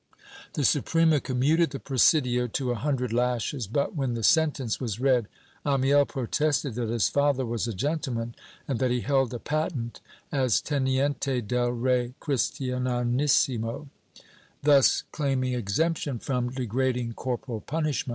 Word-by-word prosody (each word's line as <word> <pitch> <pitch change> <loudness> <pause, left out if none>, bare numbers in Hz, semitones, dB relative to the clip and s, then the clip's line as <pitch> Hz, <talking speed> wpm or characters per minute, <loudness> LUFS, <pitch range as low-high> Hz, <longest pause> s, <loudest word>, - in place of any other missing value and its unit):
The 145 - -1
Suprema 160 +2 +3
commuted 140 +7 +2
the 135 0 -6
presidio 125 -2 +2
to 125 +2 -2
a - - 0
hundred 125 -2 -1
lashes 125 0 -1
but, 140 - -1
when 135 -5 -1
the 115 - -4
sentence 150 - +2
was 115 -4 -3
read, 125 -4 +2 0.4
Amiel 140 0 +3
protested 145 +1 -1
that 115 -1 -3
his 115 -3 +2
father 140 -2 +1
was 115 0 -2
a 115 - -3
gentleman 125 - -2 0.3
and 135 -4 -1
that 130 -1 +2
he 125 0 0
held 135 -3 +1
a 120 - -3
patent 150 -4 -3 0.3
as 130 -5 +2
'Heniente 135 -2 0
del 120 +2 0
Rey 125 0 0
Christianisimo," 125 0 0 0.7
thus 140 -2 +5
claiming 135 -4 -1
exemption 130 +5 -1
from 125 0 -2
degrading 125 -1 -1
corporal 120 -2 -4
punishment. 155 -3 -2
130 Hz, 135 wpm, -27 LUFS, 120-145 Hz, 0.7 s, thus